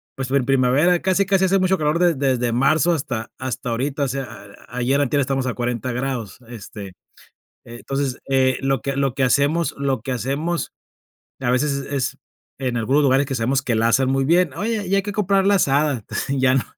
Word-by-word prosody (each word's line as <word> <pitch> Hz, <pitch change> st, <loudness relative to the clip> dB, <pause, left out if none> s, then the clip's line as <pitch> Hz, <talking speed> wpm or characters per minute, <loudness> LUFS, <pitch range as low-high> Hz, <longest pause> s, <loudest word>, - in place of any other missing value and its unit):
pues 135 Hz, -1 st, -4 dB
en 135 Hz, -2 st, +2 dB
primavera 135 Hz, +7 st, +3 dB
casi 190 Hz, +2 st, +2 dB
casi 190 Hz, 0 st, +2 dB
hace 190 Hz, +1 st, +3 dB
mucho 185 Hz, 0 st, +2 dB
calor 150 Hz, +1 st, +1 dB
desde 175 Hz, -2 st, +3 dB, 0.2 s
desde 120 Hz, -1 st, -1 dB
marzo 155 Hz, +7 st, +3 dB
hasta 130 Hz, -8 st, -4 dB
hasta 130 Hz, -2 st, -4 dB
ahorita. 135 Hz, +5 st, -1 dB
O -, -, 0 dB
sea, 130 Hz, -5 st, -6 dB, 0.2 s
ayer, 125 Hz, +3 st, 0 dB
antier, 145 Hz, +1 st, +1 dB
estamos 135 Hz, -1 st, -1 dB
a 125 Hz, -, -1 dB
40 120 Hz, 0 st, -2 dB
grados, 125 Hz, -4 st, -4 dB
este. 105 Hz, -4 st, -9 dB, 0.7 s
Entonces, 130 Hz, +3 st, -4 dB
eh, 130 Hz, -1 st, +2 dB
lo 135 Hz, -2 st, 0 dB
que 140 Hz, +3 st, -3 dB
lo 135 Hz, -2 st, +1 dB
que 135 Hz, -, 0 dB
hacemos 145 Hz, +6 st, +2 dB
lo 135 Hz, -4 st, -1 dB
que 130 Hz, -, -5 dB
hacemos 140 Hz, +8 st, -2 dB, 0.7 s
a 125 Hz, -2 st, +1 dB
veces 140 Hz, +4 st, +1 dB
es 140 Hz, 0 st, -4 dB
es 140 Hz, -2 st, -2 dB, 0.4 s
en 125 Hz, -3 st, -2 dB
algunos 130 Hz, +6 st, +2 dB
lugares 135 Hz, 0 st, +3 dB
que 135 Hz, -, -4 dB
sabemos 130 Hz, +3 st, 0 dB
que 125 Hz, -, -1 dB
la 115 Hz, +1 st, +2 dB
asan 130 Hz, +2 st, +2 dB
muy 135 Hz, 0 st, +1 dB
bien: 170 Hz, 0 st, +3 dB
"Oye, 210 Hz, +1 st, -2 dB
ya 195 Hz, -, +3 dB
hay 195 Hz, -, +1 dB
que 205 Hz, -, -4 dB
comprarla 200 Hz, 0 st, +2 dB
asada". 140 Hz, -, +1 dB, 0.2 s
Ya 130 Hz, -2 st, +2 dB
no 130 Hz, -3 st, +2 dB
135 Hz, 195 wpm, -21 LUFS, 125-150 Hz, 0.7 s, primavera